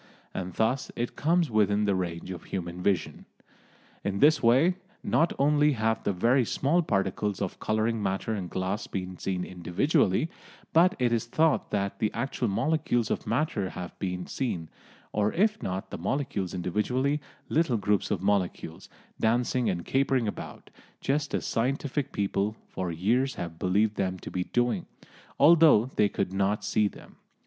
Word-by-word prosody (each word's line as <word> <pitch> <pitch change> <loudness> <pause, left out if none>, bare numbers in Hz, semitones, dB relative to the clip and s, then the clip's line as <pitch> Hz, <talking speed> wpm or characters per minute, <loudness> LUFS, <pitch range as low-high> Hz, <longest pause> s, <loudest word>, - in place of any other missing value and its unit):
And 90 -2 -5
thus 125 +4 0
it 120 0 -3
comes 165 -2 +2
within 105 -1 +3
the 100 - +2
range 90 -1 -3
of 90 -3 -8
human 90 -1 -5
vision. 95 0 -1 0.8
In 100 0 -1
this 150 +6 +5
way, 135 +11 +4 0.3
not 160 +7 +2
only 150 +1 +4
have 110 -2 0
the - - +1
very 120 +8 +3
small 145 +9 +1
particles 100 - -1
of 95 -3 -3
colouring 110 +1 0
matter 95 +3 -1
in 95 -4 -3
glass 95 +3 -3
been 90 -1 -5
seen 90 -2 -2
individually, 95 - +1 0.4
but 175 +3 +5
it 125 -2 +1
is 115 0 0
thought 155 +4 +2
that 100 -1 -2
the 110 - +1
actual 135 -2 -1
molecules 120 0 0
of - - -2
matter 115 -5 0
have 90 -1 -7
been 90 -2 -3
seen, 90 - -3 0.4
or 105 0 +1
if 215 +4 +2
not 95 +1 -4
the - - -5
molecules 100 - -2
individually, 125 - 0 0.3
little 155 -7 +2
groups 105 0 +1
of 95 -3 -1
molecules, 95 -5 -1 0.3
dancing 120 +1 +1
and 85 -3 -2
capering 135 -3 +1
about, 105 - -7 0.3
just 145 +1 -1
as - - -2
scientific 135 +3 -1
people 100 +1 -1
for 90 -2 -3
years 115 +11 +1
have 85 -1 -6
believed 105 +3 +1
them 95 -1 -1
to - - -9
be 90 0 -2
doing, 120 0 0 0.5
although 155 -7 +7
they 105 - +3
could 95 - -2
not 100 +2 0
see 105 0 +2
them. - - -12
105 Hz, 160 wpm, -28 LUFS, 95-135 Hz, 0.8 s, although